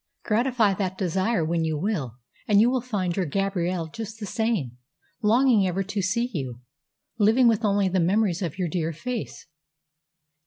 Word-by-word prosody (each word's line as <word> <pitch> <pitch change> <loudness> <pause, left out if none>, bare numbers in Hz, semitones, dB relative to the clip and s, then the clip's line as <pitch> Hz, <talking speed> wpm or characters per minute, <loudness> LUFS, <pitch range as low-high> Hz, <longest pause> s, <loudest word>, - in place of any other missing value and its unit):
Gratify 230 -2 +2
that 190 -1 -3
desire 185 0 0
when 165 +1 0
you 160 -1 -1
will, 150 - -2 0.3
and 205 -2 +5
you 235 +3 +5
will 255 -1 0
find 195 -8 -2
your 185 -4 -1
Gabrielle 180 0 -1
just 220 +5 -8
the 210 - -5
same 200 - -2 0.4
longing 225 -2 +4
ever 185 +2 -1
to 200 +1 -3
see 230 +6 0
you, 130 -7 -4 0.6
living 225 +4 +5
with 225 0 +2
only 200 -2 +2
the 185 0 +1
memories 185 +1 +1
of 170 -4 -3
your 180 -2 -1
dear 165 -1 -2
face. 215 - -5
195 Hz, 165 wpm, -25 LUFS, 170-220 Hz, 0.6 s, and